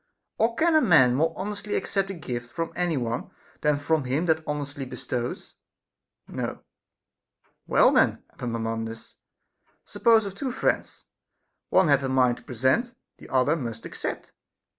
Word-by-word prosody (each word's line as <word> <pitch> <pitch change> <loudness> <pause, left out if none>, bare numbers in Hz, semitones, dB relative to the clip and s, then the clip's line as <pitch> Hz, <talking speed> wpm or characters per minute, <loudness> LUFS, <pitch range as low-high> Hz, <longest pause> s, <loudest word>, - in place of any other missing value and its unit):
Or 230 +1 +2
can 330 +4 +3
a 310 - +6
man 155 - +6
more 155 +6 +2
honestly 205 +1 -4
accept 195 -1 -1
a 195 - -4
gift 120 -6 -6
from 165 +4 -4
any 175 -3 0
one, 120 -1 -3 0.3
than 150 0 +3
from 145 0 0
him 140 +7 0
that 160 -1 +2
honestly 145 -1 -4
bestows? 125 -1 -5 0.7
No. - - -5 1.0
Well - - +5
then, - - +3
Epaminondas, 115 -1 -4 0.7
suppose 225 -2 +3
of 195 - -5
two 255 +6 -3
friends, 250 - -1 0.7
one - - +4
hath 140 -2 +4
a 135 - -2
mind 125 -2 +3
to - - -15
present, 130 - 0 0.2
the - - -13
other 135 +4 +3
must 115 -7 -5
accept. - - -6
145 Hz, 145 wpm, -26 LUFS, 125-190 Hz, 1.0 s, a